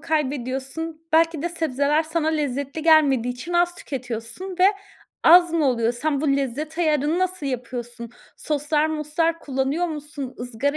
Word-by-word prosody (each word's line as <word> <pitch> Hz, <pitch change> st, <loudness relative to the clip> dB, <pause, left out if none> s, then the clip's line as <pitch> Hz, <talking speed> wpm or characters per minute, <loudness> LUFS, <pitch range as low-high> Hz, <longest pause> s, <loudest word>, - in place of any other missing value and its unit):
kaybediyorsun, 295 Hz, +1 st, -3 dB
belki 325 Hz, -1 st, +3 dB
de 345 Hz, -, 0 dB
sebzeler 300 Hz, -2 st, +1 dB
sana 320 Hz, 0 st, -1 dB
lezzetli 285 Hz, -1 st, -2 dB
gelmediği 280 Hz, -7 st, +4 dB
için 335 Hz, +8 st, -7 dB
az 350 Hz, 0 st, +2 dB
tüketiyorsun 255 Hz, -, -6 dB
ve 365 Hz, -, +5 dB, 0.6 s
az 345 Hz, +1 st, +7 dB
mı 325 Hz, -3 st, +2 dB
oluyor? 235 Hz, -2 st, +1 dB
Sen 280 Hz, +3 st, -1 dB
bu 280 Hz, -3 st, +2 dB
lezzet 290 Hz, +5 st, -3 dB
ayarını 305 Hz, 0 st, +1 dB
nasıl 370 Hz, -5 st, -1 dB
yapıyorsun? 240 Hz, -2 st, -5 dB, 0.3 s
Soslar 300 Hz, +1 st, 0 dB
moslar 315 Hz, +2 st, -1 dB
kullanıyor 275 Hz, +5 st, -1 dB
musun? 295 Hz, -4 st, -6 dB
Izgara 250 Hz, +4 st, -2 dB
300 Hz, 140 wpm, -23 LUFS, 265-325 Hz, 0.6 s, az